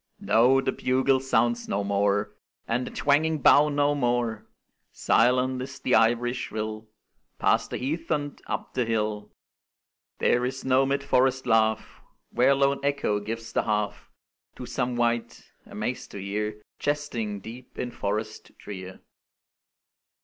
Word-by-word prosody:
No, 125 +4 +4
the - - 0
bugle 130 +1 +2
sounds 120 -3 +1
no 100 - -1
more, 100 +1 0 0.3
And 125 +2 -1
the - - -4
twanging 155 +3 +2
bow 145 +1 +6
no 145 0 +2
more; 120 -5 -1 0.4
Silent 125 +2 +2
is 130 - -7
the 125 - -1
ivory 120 +2 +3
shrill 110 -3 -5 0.5
Past - - +2
the - - -3
heath 160 +6 -3
and 145 -2 -2
up - - -4
the 125 - +1
hill; 105 -2 -2 0.9
There 120 - +2
is 130 +1 -3
no 130 +1 +3
mid 140 +1 0
forest 130 -1 +2
laugh, 110 -2 +1 0.3
Where 130 +3 +4
lone 140 0 +2
Echo 140 -7 0
gives 115 +2 -6
the - - +2
half 105 -1 -2 0.5
To - - -7
some 125 0 -2
wight, 120 -1 -1 0.2
amaz'd 105 +4 -4
to - - -6
hear 105 +2 -3 0.2
Jesting, 125 -8 -2
deep 120 +5 -11
in 125 - -3
forest 110 0 -4
drear. 95 -2 -9
120 Hz, 140 wpm, -26 LUFS, 110-135 Hz, 0.9 s, bow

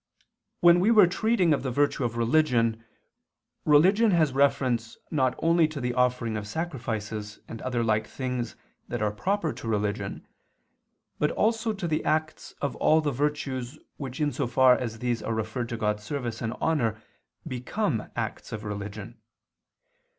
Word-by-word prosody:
3) - - -38 0.3
when 175 0 +7
we 195 +5 +3
were 215 -4 +7
treating 185 -1 +2
of 145 - 0
the 130 - -2
virtue 140 +1 +1
of 120 -1 -2
religion, 115 -3 +2 0.8
religion 190 +10 +5
has 160 -7 +3
reference 130 -4 +1
not 130 -4 +1
only 165 -1 +3
to 155 -2 -6
the 125 -1 -1
offering 125 -2 +1
of 105 -1 -4
sacrifices 110 -7 -4
and 115 - -8
other 125 -2 -1
like 110 -1 +1
things 125 -2 -4 0.3
that - - -3
are 105 - +1
proper 180 - -1
to - - -8
religion, 105 -1 -2 0.9
but 150 - +2
also 225 +1 +1
to 195 -4 -4
the 155 -1 0
acts 155 0 -2
of 140 - -1
all 155 - +4
the 150 -2 0
virtues 135 -1 -2 0.2
which 135 -1 -6
in 150 -1 +1
so 125 - -2
far 130 0 +5
as 115 -3 -4
these 120 0 -1
are 115 - -2
referred 110 +2 -3
to 115 - -3
God's 105 -1 -1
service 120 -1 -4
and 115 0 -2
honor 115 -9 0 0.5
become 130 - -2
acts - - -4
of 105 - -5
religion. 105 +2 -6
125 Hz, 165 wpm, -27 LUFS, 115-155 Hz, 0.9 s, when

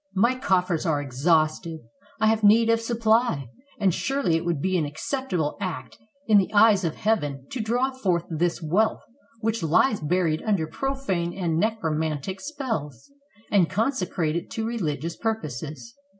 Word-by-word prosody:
My 235 +6 +4
coffers 185 - +1
are 160 -5 +1
exhausted; 155 +4 0 0.4
I 220 - +2
have 220 0 +2
need 225 +2 +6
of 230 0 +2
supply; 225 - +1 0.3
and 195 -4 +3
surely 270 -9 0
it 165 - 0
would 170 -4 -1
be 185 +5 0
an 170 - +2
acceptable 160 - -2
act 185 -4 -5 0.3
in 215 -4 +6
the 190 - -1
eyes 205 -2 +6
of 165 -3 -1
Heaven 145 -11 -1
to 255 - -4
draw 245 +4 0
forth 185 -10 -1
this 170 +1 -1
wealth 200 +8 +1 0.4
which 225 -1 -1
lies 175 - +3
buried 160 0 0
under 200 -7 0
profane 190 - -2
and 170 -4 -1
necromantic 160 -4 -1
spells, 235 - -5 0.4
and 190 -5 +4
consecrate 185 - -1
it 170 - -3
to 225 -1 -3
religious 170 - -3
purposes." 150 - -4
185 Hz, 150 wpm, -25 LUFS, 160-225 Hz, 0.4 s, need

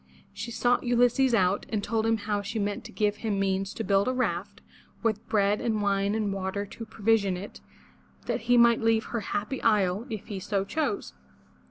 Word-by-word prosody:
She 235 - -6
sought 245 +1 +2
Ulysses 245 +1 +3
out 190 0 +1
and 210 -2 -2
told 225 +1 0
him 225 0 +3
how 205 0 -2
she 205 +3 -5
meant 205 -1 -2
to - - -9
give 210 -1 0
him 210 -3 -2
means 195 0 0
to 225 - -3
build 200 -1 +2
a 255 - +1
raft, 200 -5 -2 0.4
with 220 -1 -1
bread 205 -1 +2
and 220 -2 0
wine 200 0 +1
and 210 -3 -1
water 195 +1 -3
to 225 +3 -9
provision 210 -3 +1
it, 200 +3 -9 0.6
that - - -2
he 245 - +6
might 235 -1 +5
leave 225 0 +3
her 235 - -3
happy 210 +4 -3
isle, 210 0 +2
if 215 -4 -5 0.2
so 200 -1 0
he - - -11
chose. 315 - -2
210 Hz, 195 wpm, -27 LUFS, 200-230 Hz, 0.6 s, he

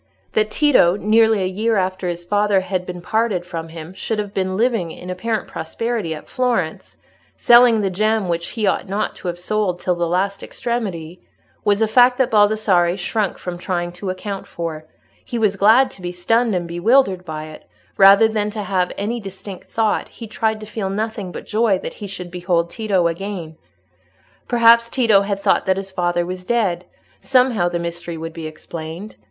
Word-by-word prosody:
That 215 0 +2
Tito 215 - +4
nearly 220 -1 +3
a - - 0
year 215 +5 0
after 185 -1 -1
his 175 0 -4
father 205 0 +2
had 185 -1 -3
been 180 -1 -7
parted 215 -4 0
from 165 -2 -6
him 165 +1 -9
should 220 +3 -3
have 205 -1 -4
been 185 -1 -1
living 225 -7 +1
in 180 +2 -8
apparent 220 +4 -2
prosperity 205 0 -3
at 155 - -11
Florence, 240 -11 -2 0.4
selling 240 -2 +6
the 195 -2 -1
gem 215 +1 +1
which 170 -1 -2
he 220 -3 -2
ought 195 0 0
not 205 +2 -2
to - - -8
have 175 0 -3
sold 185 0 -1
till 180 - 0
the 175 -1 -1
last 195 +3 -1
extremity, 185 -8 -4 0.4
was 205 +1 +2
a - - +2
fact 245 +3 +5
that 260 -2 +1
Baldassarre 205 -4 +3
shrank 205 +1 -1
from 175 -1 -6
trying 175 -1 -2
to 180 +2 -6
account 195 +1 -5
for: 160 -2 -5 0.4
he 240 - -5
was 210 -3 +2
glad 225 +7 +5
to 195 - -13
be 175 0 -4
stunned 225 +5 +1
and 175 -1 -2
bewildered 190 +2 +2
by 155 -2 -6
it, 155 - -14 0.3
rather 200 +3 +7
than 215 -1 -1
to 210 0 -5
have 185 -3 0
any 225 +4 -2
distinct 195 -2 -9
thought; 220 -2 0
he 230 - -10
tried 220 0 -1
to - - -7
feel 210 -2 -4
nothing 210 -1 -3
but - - -8
joy 215 -2 +2
that - - -6
he 205 - -8
should 180 -2 -8
behold 175 -1 -1
Tito 200 -6 0
again. 170 -1 -4 0.9
Perhaps 235 -1 +5
Tito 225 -7 +4
had 200 0 -2
thought 200 - +1
that 190 0 +2
his 195 0 -5
father 175 -1 0
was 180 +1 -6
dead; 185 -5 0 0.3
somehow 250 -9 +2
the 175 - -2
mystery 170 0 -5
would 165 0 -6
be 160 -1 -6
explained. 160 +5 -8
195 Hz, 190 wpm, -20 LUFS, 175-220 Hz, 0.9 s, rather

